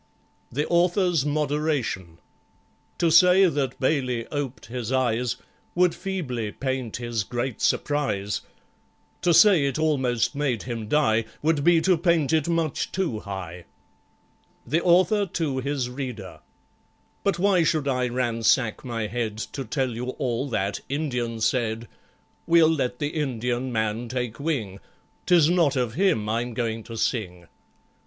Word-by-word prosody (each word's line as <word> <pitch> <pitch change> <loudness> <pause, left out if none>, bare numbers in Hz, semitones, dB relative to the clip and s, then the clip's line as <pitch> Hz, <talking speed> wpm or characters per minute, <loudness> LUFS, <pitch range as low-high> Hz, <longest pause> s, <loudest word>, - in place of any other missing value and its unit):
The 145 +5 -1
Author's 175 -3 +2
Moderation 145 - -1 0.8
To 170 -1 +2
say 180 +3 +7
that 140 -7 -1
BAILEY 130 -4 0
oped 140 -4 -4
his 120 0 -5
eyes 125 -2 +1 0.4
Would 180 -1 +3
feebly 150 - -4
paint 130 -3 -3
his 120 -3 -2
great 120 +3 -4
surprise— 120 -9 0 0.8
To 175 - +3
say 170 -2 +6
it 140 0 -1
almost 135 -7 +1
made 140 -7 -1
him 115 -3 -5
die 115 -5 +2 0.2
Would 155 -2 +2
be 170 0 +5
to 180 -1 +3
paint 165 -4 +2
it 160 0 +2
much 165 -3 -1
too 170 - -1
high. 90 -4 -7 1.0
The 155 +7 +1
Author 185 +3 +4
to 155 -6 -2
his 135 -1 -2
Reader 125 - -6 0.8
But 200 -3 +1
why 190 -1 +3
should 155 -2 +1
I 125 -2 +1
ransack 120 -2 +1
my 115 -4 -3
head 110 -1 -3 0.2
To 135 - -4
tell 130 +2 -1
you 120 +2 -4
all 130 +1 -2
that 100 -3 -1
Indian 125 -6 -2
said; 115 -1 0 0.6
We'll 165 -1 +5
let 130 -5 -1
the 145 +1 -2
Indian 125 -4 -2
man 110 +1 -1
take 125 -1 -3
wing,— 120 -11 -2 0.5
'Tis 170 -3 +5
not 165 -6 +3
of 125 -3 -1
him 170 - +1
I'm 115 +2 -2
going 115 -2 -2
to 115 -1 -8
sing. 90 -8 -2
130 Hz, 140 wpm, -25 LUFS, 115-160 Hz, 1.0 s, say